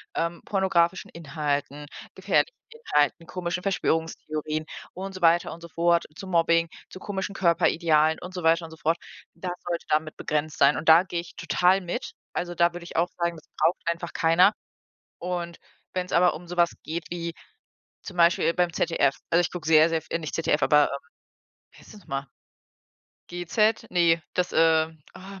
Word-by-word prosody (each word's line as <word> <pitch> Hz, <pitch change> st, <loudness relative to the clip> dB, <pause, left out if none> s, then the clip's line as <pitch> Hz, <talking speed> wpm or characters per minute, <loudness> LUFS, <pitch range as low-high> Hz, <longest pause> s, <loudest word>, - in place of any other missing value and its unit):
ähm, 170 Hz, +1 st, -2 dB
pornografischen 190 Hz, -2 st, +1 dB
Inhalten, 145 Hz, -2 st, -3 dB, 0.3 s
gefährlichen 480 Hz, -, +1 dB
Inhalten, 170 Hz, -, 0 dB
komischen 180 Hz, 0 st, -3 dB
Verschwörungstheorien 155 Hz, -4 st, -2 dB, 0.3 s
und 195 Hz, +1 st, -6 dB
so 185 Hz, -, -9 dB
weiter 170 Hz, 0 st, +4 dB
und 170 Hz, -, -12 dB
so 170 Hz, -, -9 dB
fort, 170 Hz, +1 st, +2 dB
zu 195 Hz, +1 st, -9 dB
Mobbing, 165 Hz, -1 st, +2 dB, 0.2 s
zu 185 Hz, -, -10 dB
komischen 195 Hz, 0 st, -4 dB
Körperidealen 165 Hz, -3 st, +2 dB
und 180 Hz, +1 st, -8 dB
so 180 Hz, -2 st, -5 dB
weiter 165 Hz, +1 st, +3 dB
und 160 Hz, -, -12 dB
so 160 Hz, -, -12 dB
fort. 165 Hz, +2 st, 0 dB, 0.4 s
Das 180 Hz, +1 st, -5 dB, 0.2 s
sollte 170 Hz, -1 st, -3 dB
damit 155 Hz, 0 st, 0 dB
begrenzt 150 Hz, 0 st, -2 dB
sein 140 Hz, +1 st, +5 dB
und 160 Hz, -, -6 dB
da 165 Hz, +3 st, +8 dB
gehe 175 Hz, -2 st, -4 dB
ich 170 Hz, -, -15 dB
total 180 Hz, +3 st, +2 dB
mit. 175 Hz, -1 st, -5 dB, 0.2 s
Also, 175 Hz, 0 st, -3 dB
da 170 Hz, 0 st, +3 dB
würde 175 Hz, -, -8 dB
ich -, -, -11 dB
auch 170 Hz, +2 st, +2 dB
sagen, 170 Hz, 0 st, -1 dB
das 155 Hz, -, -16 dB
braucht 165 Hz, +3 st, +2 dB
einfach 170 Hz, 0 st, -3 dB
keiner. 170 Hz, +5 st, +4 dB, 0.7 s
Und 175 Hz, -1 st, -4 dB, 0.3 s
wenn's 180 Hz, -1 st, -3 dB
aber 175 Hz, +1 st, +4 dB
um 175 Hz, +2 st, -10 dB
sowas 175 Hz, -1 st, +2 dB
geht 165 Hz, +2 st, -4 dB
wie 170 Hz, -1 st, -4 dB, 0.7 s
zum 185 Hz, -, -9 dB
Beispiel, 170 Hz, 0 st, +4 dB
beim 175 Hz, -1 st, +1 dB
ZDF 150 Hz, -5 st, +1 dB
also, 170 Hz, -, +4 dB
ich 175 Hz, -, 0 dB
gucke 175 Hz, -4 st, -7 dB
sehr, 160 Hz, 0 st, +6 dB
sehr 165 Hz, -1 st, -1 dB
v -, -, -22 dB
äh, 165 Hz, -, 0 dB
nicht 155 Hz, -3 st, -6 dB
ZDF, 160 Hz, -2 st, 0 dB
aber, 150 Hz, -1 st, +5 dB
ähm, 140 Hz, -, -3 dB, 0.7 s
wie -, -, -19 dB
heißt -, -, -15 dB
das 210 Hz, -, -13 dB
noch 175 Hz, -, -23 dB
mal? 135 Hz, 0 st, -4 dB, 1.0 s
GEZ? 180 Hz, +5 st, 0 dB
Ne, 170 Hz, -2 st, +3 dB
das, 180 Hz, 0 st, -1 dB
äh, 160 Hz, 0 st, +4 dB, 0.3 s
och. 195 Hz, +1 st, -11 dB
170 Hz, 180 wpm, -26 LUFS, 160-180 Hz, 1.0 s, da